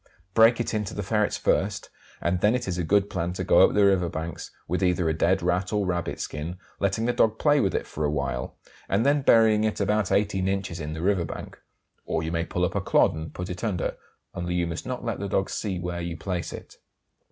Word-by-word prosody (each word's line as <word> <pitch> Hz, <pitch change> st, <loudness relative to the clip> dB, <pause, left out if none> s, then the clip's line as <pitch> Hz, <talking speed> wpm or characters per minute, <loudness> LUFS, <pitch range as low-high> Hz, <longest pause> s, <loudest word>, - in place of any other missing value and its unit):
Break 115 Hz, +2 st, +6 dB
it 120 Hz, -, -2 dB
in 105 Hz, -1 st, 0 dB
to -, -, -7 dB
the 105 Hz, -, -3 dB
ferrets 105 Hz, +1 st, 0 dB
first, 100 Hz, 0 st, 0 dB, 0.3 s
and 90 Hz, 0 st, 0 dB
then 105 Hz, +3 st, +4 dB
it 120 Hz, -3 st, -3 dB
is 90 Hz, -1 st, -2 dB
a -, -, 0 dB
good 100 Hz, +4 st, +3 dB
plan 85 Hz, -2 st, -2 dB
to -, -, -3 dB
go -, -, +4 dB
up -, -, +5 dB
the 105 Hz, -1 st, +5 dB
river 95 Hz, -3 st, +3 dB
banks, 80 Hz, 0 st, -5 dB, 0.2 s
with 90 Hz, +3 st, -1 dB
either 90 Hz, -2 st, +2 dB
a 80 Hz, -, +2 dB
dead 85 Hz, +2 st, +1 dB
Rat 90 Hz, +2 st, 0 dB
or 105 Hz, -2 st, +1 dB
rabbit 90 Hz, -2 st, -2 dB
skin, 80 Hz, +4 st, -5 dB, 0.2 s
letting 100 Hz, +3 st, 0 dB
the 120 Hz, -, +1 dB
dog 110 Hz, -2 st, +2 dB
play 145 Hz, +2 st, +3 dB
with 95 Hz, -7 st, +1 dB
it -, -, -1 dB
for 75 Hz, -, -5 dB
a 75 Hz, -, +2 dB
while, 70 Hz, -4 st, -3 dB, 0.3 s
and 100 Hz, +5 st, +2 dB
then 145 Hz, +1 st, +3 dB
burying 110 Hz, -4 st, +5 dB
it 110 Hz, -1 st, -1 dB
about 105 Hz, 0 st, +1 dB
18 100 Hz, -2 st, +1 dB
inches 95 Hz, -3 st, -2 dB
in 75 Hz, 0 st, -4 dB
the 80 Hz, +1 st, -5 dB
river 95 Hz, -2 st, +2 dB
bank; -, -, -8 dB, 0.4 s
or 80 Hz, -, -2 dB
you 80 Hz, -, -3 dB
may 85 Hz, 0 st, 0 dB
pull 90 Hz, +1 st, -1 dB
up -, -, -3 dB
a -, -, 0 dB
clod -, -, +3 dB
and 80 Hz, -1 st, -7 dB
put 90 Hz, -, -4 dB
it 90 Hz, +3 st, -6 dB
under, 100 Hz, -7 st, -1 dB, 0.4 s
only 90 Hz, 0 st, -3 dB
you 85 Hz, -1 st, +1 dB
must 85 Hz, +5 st, -5 dB
not 125 Hz, -1 st, -4 dB
let 115 Hz, -3 st, -2 dB
the 100 Hz, 0 st, -3 dB
dog 95 Hz, +1 st, 0 dB
see 100 Hz, -4 st, -2 dB
where 90 Hz, 0 st, -4 dB
you 85 Hz, -1 st, -4 dB
place 90 Hz, -1 st, -3 dB
it. -, -, -10 dB
95 Hz, 245 wpm, -26 LUFS, 85-105 Hz, 0.4 s, Break